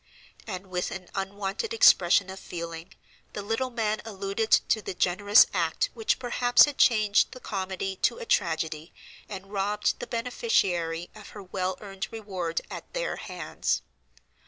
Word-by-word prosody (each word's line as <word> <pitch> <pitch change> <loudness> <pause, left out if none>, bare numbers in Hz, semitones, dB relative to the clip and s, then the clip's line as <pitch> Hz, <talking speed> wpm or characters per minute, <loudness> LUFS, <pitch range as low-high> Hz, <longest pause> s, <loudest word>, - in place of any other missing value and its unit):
And 190 -2 -5
with 180 -1 -2
an 185 -2 -8
unwonted 200 - -3
expression 195 - +5
of 190 - -8
feeling, 170 0 -7 0.4
the 205 - -5
little 225 +5 -1
man 220 -3 -1
alluded 200 +1 -3
to 220 - +3
"the 190 - -6
generous 205 +5 +5
act 170 -4 0
which 225 -2 0
perhaps 245 -1 +5
had 290 -2 -6
changed 215 -4 +4
the 255 - -10
comedy 190 -2 -4
to - - +1
a 480 - -7
tragedy 160 - -1 0.3
and 195 0 -8
robbed 205 +1 0
the 245 - -6
beneficiary 185 - 0
of 215 - -12
her 205 - -8
well 185 0 -3
earned 195 -1 -5
reward 190 -7 -3
at - - -8
their - - -2
hands." 180 -4 -3
195 Hz, 150 wpm, -27 LUFS, 185-220 Hz, 0.4 s, expression